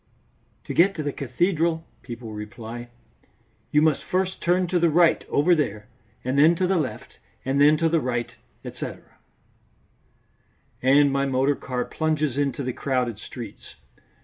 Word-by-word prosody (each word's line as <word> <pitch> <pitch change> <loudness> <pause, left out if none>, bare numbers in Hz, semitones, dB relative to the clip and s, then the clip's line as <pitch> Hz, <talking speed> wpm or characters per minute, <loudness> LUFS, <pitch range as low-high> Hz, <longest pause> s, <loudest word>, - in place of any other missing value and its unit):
"To - - -5
get 195 +4 +4
to 155 - -3
the 145 - -1
cathedral," 165 +4 0 0.2
people 115 -3 -8
reply, 115 +3 -8 0.8
"you 150 +1 +3
must 150 -3 +2
first 185 +4 -1
turn 180 +1 +2
to 180 - +2
the 170 0 +4
right 170 +1 +4
over 160 +5 +3
there, 110 -9 -1 0.3
and 130 +2 0
then 160 +4 +6
to 185 +2 0
the 185 0 +2
left, 145 -5 -5 0.3
and 135 +2 +1
then 150 +2 +6
to 165 +1 +2
the 165 -1 +2
right, 120 -2 -2 0.3
etc." - - -7 1.8
And 140 +2 +5
my 140 0 +1
motor 135 +2 +2
car 125 -2 -3
plunges 155 -4 -1
into 140 0 -1
the 130 -1 -2
crowded 125 -6 -1
streets. 115 -1 -10
145 Hz, 150 wpm, -24 LUFS, 125-165 Hz, 1.8 s, then